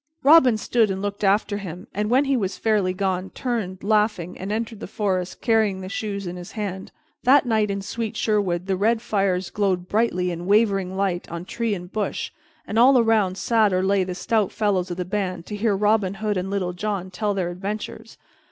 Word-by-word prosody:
Robin 270 -6 +7
stood 225 0 +2
and 190 0 -2
looked 205 +1 -4
after 205 +1 +2
him, 180 0 -7
and, 210 +1 -1
when 260 +4 +4
he 275 0 +2
was 195 -5 -2
fairly 210 -4 +1
gone, 185 0 -2
turned, 215 -7 -3
laughing, 210 -4 +1
and 190 +2 -5
entered 225 0 -3
the - - -6
forest 190 -3 -2
carrying 215 -4 +2
the 185 - -6
shoes 200 0 -4
in 175 0 -5
his 175 +3 -9
hand. 195 -3 -5 0.3
That 265 +2 +5
night 220 -3 +1
in 200 0 -3
sweet 220 +1 -4
Sherwood 190 -5 0
the 190 -1 0
red 220 +4 +2
fires 195 -5 -1
glowed 185 -3 0
brightly 185 -4 +1
in 175 +1 -6
wavering 195 -3 +2
light 190 -3 -1
on 170 +1 -5
tree 230 +1 -2
and 180 0 -9
bush, 215 -1 -2 0.3
and 220 - -1
all 260 +2 +7
around 220 -5 +2
sat 220 -2 +2
or 185 0 +1
lay 195 0 +2
the 180 0 -5
stout 210 +2 0
fellows 200 -4 0
of 175 - -4
the 180 - -2
band 185 -3 -3
to 210 - -6
hear 205 0 +1
Robin 205 -2 +2
Hood 210 +1 -1
and 185 +1 -2
Little 190 -3 -1
John 190 -1 -3
tell 205 +2 -1
their 180 -3 -1
adventures. 210 +4 -6
200 Hz, 205 wpm, -23 LUFS, 185-220 Hz, 0.3 s, Robin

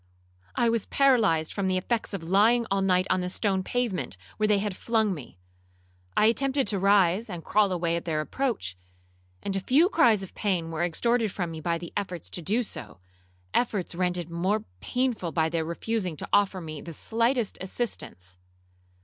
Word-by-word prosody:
'—'I 235 - +3
was 230 -3 0
paralyzed 220 - +3
from 200 -2 -1
the 185 0 +1
effects 225 +5 -1
of 195 -5 -4
lying 215 +7 +4
all 195 0 +2
night 185 -1 +3
on 185 - +2
the 180 - -2
stone 190 0 0
pavement, 185 - -2 0.2
where 215 - +2
they 210 -1 +4
had 200 -1 -2
flung 220 -1 +1
me. 135 - -10 0.8
I - - +5
attempted 270 +4 +2
to 200 - +1
rise 195 +2 +3
and 175 -4 -6
crawl 210 -2 +3
away 170 -2 0
at 170 - -4
their 160 -3 -1
approach, 175 - -2 0.7
and 195 - -1
a - - +1
few 285 - +4
cries 230 - +4
of 190 - -10
pain 180 -6 -1
were 165 +1 -1
extorted 225 +6 +1
from 175 -3 -3
me 160 -1 -7
by 170 +1 0
my 170 0 -8
efforts 180 -5 -4
to 175 - -2
do 215 +9 +1
so—efforts 95 - -5
rendered 175 -1 -1
more 190 +6 0
painful 245 - -1
by 160 -1 +1
their 165 -1 -1
refusing 180 0 -2
to - - -4
offer 200 -2 +3
me 155 -3 -7
the 170 - -8
slightest 230 - 0
assistance. 95 - -5
190 Hz, 180 wpm, -27 LUFS, 170-225 Hz, 0.8 s, I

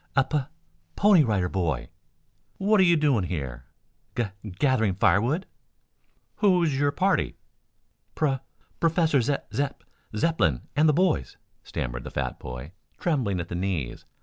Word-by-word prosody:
"A 135 - +5
Pu 150 +2 0 0.6
Pony 200 -6 +6
Rider 100 -7 +1
Boy." 85 -8 -2 0.7
"What 205 +2 +3
are - - +7
you 175 -2 +5
doing 140 -10 +2
here?" 65 -8 -5 0.5
"Ga 115 -4 -1 0.3
gathering 110 -6 +2
firewood." 120 - +2 0.9
"Who 185 -4 +4
is 155 -5 +1
your 145 +1 +2
party?" 185 +5 +1 0.8
"Pro 135 -4 +1 0.4
professor 165 -4 +3
Ze 140 +4 +1 0.2
Zep 140 0 -2 0.3
Zepplin 95 - +2
and 155 +2 +5
the - - +4
boys," 180 +1 +1 0.2
stammered - - -4
the - - -6
fat - - -3
boy, 60 +5 -7 0.3
trembling 125 - 0
at 85 - -5
the - - -5
knees. 90 -9 -3
135 Hz, 140 wpm, -26 LUFS, -, 0.9 s, are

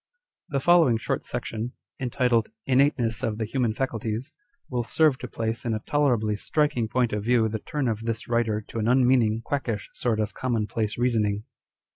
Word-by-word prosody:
The 140 - 0
following 160 -5 +5
short - - -2
section, 115 +3 -4 0.3
entitled 125 -2 +1 0.2
INNATENESS 130 -4 +2
OF 105 -1 -1
THE 110 - -1
HUMAN 120 0 0
FACULTIES, 115 +1 -3 0.4
will 125 -2 -1
serve 150 +2 +2
to 125 - -5
place 115 0 -3
in 115 -2 0
a - - -2
tolerably 120 -8 +2
striking 145 -2 0
point 120 0 +1
of 105 -1 -1
view 115 -1 +3
the 110 0 -3
turn 145 +4 -2
of 110 -2 0
this 115 0 -4
writer 115 -3 +1
to 115 - -4
an 110 - 0
un 125 +1 +4
meaning, 115 -3 +3
quackisli 120 -8 -2
sort 115 -3 0
of 105 -1 -1
commonplace 110 -3 -1
reasoning. 110 -4 +1
115 Hz, 175 wpm, -26 LUFS, 110-130 Hz, 0.4 s, following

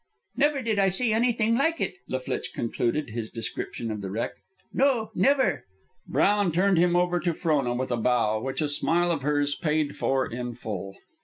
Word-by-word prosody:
"Never 290 -1 +2
did 220 -3 0
I 195 -1 +4
see 220 +4 +1
anything 230 -1 +2
like 325 +6 +1
it," 180 - -2
La 130 - -1
Flitche 130 - -4
concluded 120 +3 -1
his 110 -1 -4
description 115 0 -5
of 105 -1 -4
the 95 - -5
wreck. 110 +5 -2 0.4
"No, 245 -5 +2
never." 275 +1 +2 0.4
Brown 205 -3 +2
turned 185 +2 +3
him 175 0 +3
over 175 0 +2
to 170 -2 -1
Frona 140 -8 +1
with 130 +1 -2
a 120 - +1
bow, 110 -2 +1
which 135 +3 -3
a - - +1
smile 170 +4 +1
of 160 -4 -1
hers 145 0 +1
paid 150 -1 -1
for 135 -1 +1
in 120 0 -5
full. 95 -3 -6
155 Hz, 185 wpm, -26 LUFS, 120-205 Hz, 0.4 s, I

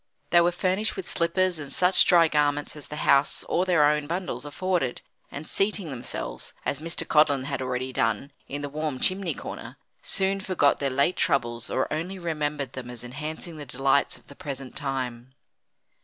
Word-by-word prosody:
They 175 - +7
were 175 +1 +3
furnished 185 +4 0
with 190 - -5
slippers 175 +1 +1
and 145 -2 -6
such 180 +1 +5
dry 170 -2 +6
garments 145 -1 +1
as 150 - -7
the 150 - -7
house 140 +1 +4
or 180 - 0
their 165 -5 +5
own 150 0 +2
bundles 165 -6 -3
afforded, 165 -3 -1 0.3
and 145 +3 -7
seating 195 -5 0
themselves, 125 -2 -5
as 140 - -1
Mr. 165 +2 -2
Codlin 145 -3 +4
had 135 -1 -3
already 130 0 -2
done, 115 +5 0 0.2
in 145 +1 -5
the - - -2
warm 150 -2 -3
chimney 185 -5 +1
corner, - - -8 0.2
soon 195 +1 +1
forgot 180 -7 +2
their 140 - 0
late 140 +7 +2
troubles 120 -6 0
or 130 - 0
only 175 +5 -3
remembered 150 -6 -2
them 125 -2 -7
as 120 -1 -8
enhancing 155 +6 -6
the 150 - -6
delights 135 +3 +2
of - - -23
the - - -13
present 135 -3 -6
time. 130 -3 -3
150 Hz, 180 wpm, -26 LUFS, 135-170 Hz, 0.3 s, They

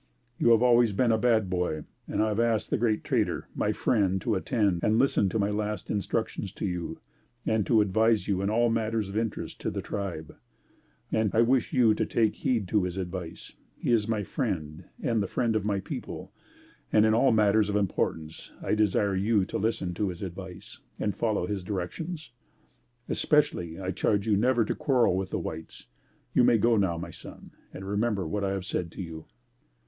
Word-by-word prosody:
You - - +4
have 115 +1 +4
always 120 -3 +5
been 115 +4 +2
a 110 - +3
bad 110 -4 +3
boy, 90 -4 -1 0.2
and - - 0
I 110 - +1
have 105 +1 -1
asked 115 -2 +1
the - - +2
'Great 110 -2 +1
Trader' - - 0
my - - 0
friend 95 -5 +1
to 115 - 0
attend 100 -3 0
and 110 +1 +3
listen 120 -6 +3
to 110 - -1
my 100 -1 +1
last 105 -1 -3
instructions 105 -1 -2
to - - -4
you 90 -3 -3 0.5
and 110 -2 +1
to 110 -3 +5
advise 110 0 +2
you 95 -2 0
in 100 - 0
all 115 +2 +2
matters 110 -2 -1
of 100 - -7
interest 110 0 -3
to - - -1
the - - -4
tribe, 90 -6 -5 0.8
and 110 -1 +2
I 115 - +5
wish 125 0 +2
you 120 -4 +4
to - - 0
take 110 -2 +1
heed 120 -7 0
to 105 -4 +2
his 90 0 -4
advice; 90 -2 -6 0.2
he - - -1
is 110 -3 +3
my 110 -2 0
friend 90 - -3 0.2
and 115 -3 +1
the 100 - -1
friend 115 +1 0
of 105 -2 0
my 100 -2 0
people 95 - -7 0.6
and 110 0 +5
in 110 - +4
all 125 +3 +4
matters 105 -1 +3
of 105 - -1
importance 80 -5 -2
I - - 0
desire 105 -2 +2
you 100 +1 +2
to - - -4
listen 100 -4 -1
to 100 +2 -1
his 90 +1 -6
advice 95 0 -8 0.2
and 105 - -1
follow 110 -6 0
his 95 0 -3
directions. 120 - -5 0.8
Especially, 90 - +1
I 95 0 -2
charge 100 +2 0
you 110 -2 +3
never 120 +2 +3
to - - -1
quarrel 130 -10 +2
with 95 0 -2
the - - -2
whites. 80 0 -7 0.5
You 125 - +5
may 120 - +5
go 115 +2 +3
now 95 -5 +1
my 85 - -6
son, - - -12 0.2
and 95 - -8
remember 100 -3 0
what 100 +5 -2
I 100 - +1
have 95 -1 -4
said 85 -4 -3
to - - -6
you." 80 -2 -8
105 Hz, 200 wpm, -28 LUFS, 95-115 Hz, 0.8 s, always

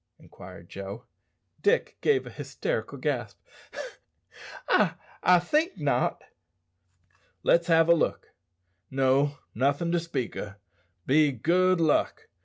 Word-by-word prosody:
inquired 85 - -13
Joe. 100 +6 -8 0.6
Dick 450 +4 +1
gave 420 -3 +2
a - - -9
hysterical - - -4
gasp. - - -3 1.3
"I - - +3 0.3
I 180 0 +6
think 300 - 0
not." 145 -4 0 1.2
"Let's 170 0 +3
have 165 -1 +4
a 170 - +7
look. 170 - -1 0.6
No, 135 +2 +2 0.2
nothin' 140 +7 0
to 175 - +2
speak 165 -7 -4
o', 100 -1 -6 0.5
be 150 +2 +4
good 180 +8 +2
luck. 160 -2 +1
160 Hz, 110 wpm, -27 LUFS, 135-175 Hz, 1.3 s, a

